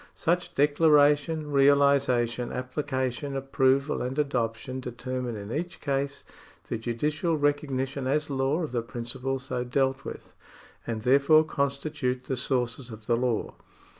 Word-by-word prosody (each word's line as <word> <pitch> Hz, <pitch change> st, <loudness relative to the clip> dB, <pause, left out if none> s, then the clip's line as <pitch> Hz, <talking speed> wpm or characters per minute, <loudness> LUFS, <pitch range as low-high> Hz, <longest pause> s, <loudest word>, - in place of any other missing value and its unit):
Such 175 Hz, +2 st, -1 dB
declaration, 150 Hz, +1 st, +3 dB
realisation, 135 Hz, -4 st, +3 dB
application, 130 Hz, +1 st, -3 dB
approval, 135 Hz, +1 st, +1 dB
and 130 Hz, +3 st, -3 dB
adoption 130 Hz, -3 st, -1 dB
determine 125 Hz, -1 st, -4 dB
in 100 Hz, +1 st, -7 dB
each 175 Hz, +6 st, -4 dB
case 140 Hz, 0 st, -2 dB, 0.4 s
the 115 Hz, -, -3 dB
judicial 150 Hz, +8 st, -1 dB
recognition 140 Hz, -2 st, -1 dB
as 150 Hz, +2 st, +1 dB
law 140 Hz, +4 st, 0 dB
of 155 Hz, -, -4 dB
the 120 Hz, -2 st, 0 dB
principle 125 Hz, +3 st, -3 dB
so 130 Hz, -1 st, -4 dB
dealt 135 Hz, +1 st, 0 dB
with, -, -, -9 dB, 0.5 s
and 110 Hz, -2 st, -3 dB
there 130 Hz, +3 st, +5 dB
fore 155 Hz, +2 st, +5 dB
constitute 140 Hz, -3 st, -2 dB
the 130 Hz, -, -2 dB
sources 125 Hz, -1 st, -1 dB
of 110 Hz, -1 st, -10 dB
the 120 Hz, -, +2 dB
law. 120 Hz, -2 st, -1 dB
135 Hz, 135 wpm, -27 LUFS, 125-145 Hz, 0.5 s, there